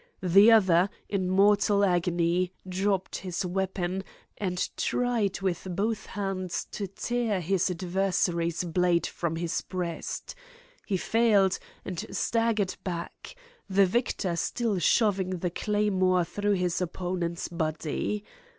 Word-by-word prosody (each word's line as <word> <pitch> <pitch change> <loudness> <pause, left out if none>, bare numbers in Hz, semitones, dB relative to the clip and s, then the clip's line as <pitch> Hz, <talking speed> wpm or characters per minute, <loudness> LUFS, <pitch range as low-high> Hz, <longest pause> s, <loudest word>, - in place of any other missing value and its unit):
The 195 +5 +7
other, 190 -4 +5 0.2
in 190 -3 0
mortal 200 +1 +4
agony, 175 0 +1 0.2
dropped 190 +1 -1
his 185 0 -3
weapon, 190 0 -2 0.4
and 180 -3 -1
tried 235 -6 0
with 190 -1 -2
both 215 +3 -1
hands 190 -3 -3
to 200 - -4
tear 225 +1 -1
his 190 +2 +1
adversary's 175 -2 0
blade 175 0 +2
from 170 -2 -3
his 165 0 -2
breast. 180 -3 -4 0.5
He 195 - +1
failed, 205 -2 +3 0.3
and 180 -3 -4
staggered 225 -4 0
back, 175 - -6 0.3
the 195 +1 +5
victor 190 -3 0
still 220 +2 -1
shoving 190 -1 +2
the 175 0 -2
claymore 190 -3 +1
through 205 +4 -1
his 180 -2 0
opponent's 175 -1 -3
body. 165 +4 -2
185 Hz, 115 wpm, -28 LUFS, 175-205 Hz, 0.5 s, The